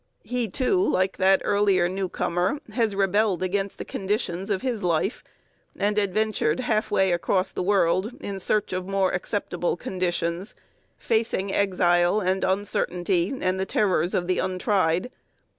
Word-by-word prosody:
He, 245 -2 -2
too, 265 - +1
like 190 - +1
that 190 0 +3
earlier 200 -3 +3
newcomer, 185 - -1
has 225 -5 0
rebelled 195 -1 +1
against 195 +1 -2
the - - -6
conditions 195 -1 -2
of 200 +1 -1
his 245 -5 -2
life, 175 +4 0 0.5
and 205 +1 +1
adventured 205 -3 0
halfway 215 -5 +1
across 185 +2 0
the - - -4
world 190 +2 +2
in 195 -1 -5
search 210 +1 0
of 185 0 -3
more 195 -1 +1
acceptable 180 -1 -2
conditions, 180 +2 -2 0.4
facing 220 -4 -1
exile 180 -1 +2
and 190 -1 0
uncertainty 185 -2 0
and 185 0 0
the 190 - 0
terrors 185 -4 +1
of 175 - 0
the 185 - +1
untried. 185 +2 0
190 Hz, 140 wpm, -25 LUFS, 180-205 Hz, 0.5 s, that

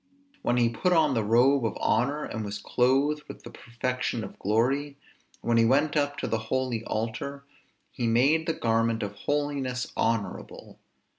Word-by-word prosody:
When 120 - +1
he 120 -1 +4
put 120 +11 0
on 155 -4 +4
the 115 -3 +1
robe 125 +5 +4
of 115 - -2
honor, 140 +7 +1
and 110 - -4
was 100 0 -4
clothed 135 +7 +1
with - - -10
the - - -10
perfection 120 -1 -3
of 95 - -9
glory, 135 +7 0 0.4
when 115 0 +1
he 115 - +5
went 145 +5 +2
up 145 -1 0
to - - -3
the 115 - -1
holy 130 -4 -1
altar, 120 +6 -4 0.5
he 120 -3 -2
made 140 +8 +3
the 165 - +1
garment 115 -2 0
of 100 -1 -4
holiness 135 +1 -2
honorable. 115 -3 -3
125 Hz, 165 wpm, -27 LUFS, 115-140 Hz, 0.5 s, he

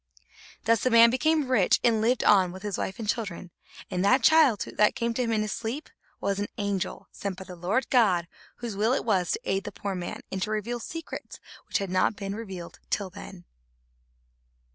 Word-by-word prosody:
Thus 230 -1 +3
the 255 - +2
man 230 -1 +7
became 305 +3 +2
rich 210 -8 +4
and 225 -3 +3
lived 240 +3 +2
on 190 -3 +5
with 190 +2 -10
his 205 -3 -2
wife 190 - -3
and 225 - -5
children. 195 -5 -3 0.4
And 180 0 0
that 255 +5 +4
child, 305 -8 +5
that 210 0 +2
came 235 0 -1
to 250 - -1
him 235 -2 0
in 215 -1 +1
his 215 - -3
sleep, 240 +10 -4 0.3
was 200 0 -1
an 205 - -1
angel 200 -3 -3
sent 195 -2 -5
by 190 - -7
the 185 -1 -10
Lord 185 +9 0
God, 190 -9 +3 0.3
whose 235 -4 -6
will 220 +5 +2
it - - -1
was 190 -6 +1
to - - -2
aid 195 0 -1
the - - -6
poor 200 -1 -4
man, 180 -1 -5
and 190 - -3
to 210 - -1
reveal 215 +3 -2
secrets 330 +7 -7 0.3
which - - +1
had 195 -2 -3
not 185 +3 +2
been 195 -1 -5
revealed 190 -6 -7
till 195 -3 -1
then. 185 -2 -11
210 Hz, 205 wpm, -27 LUFS, 190-235 Hz, 0.4 s, man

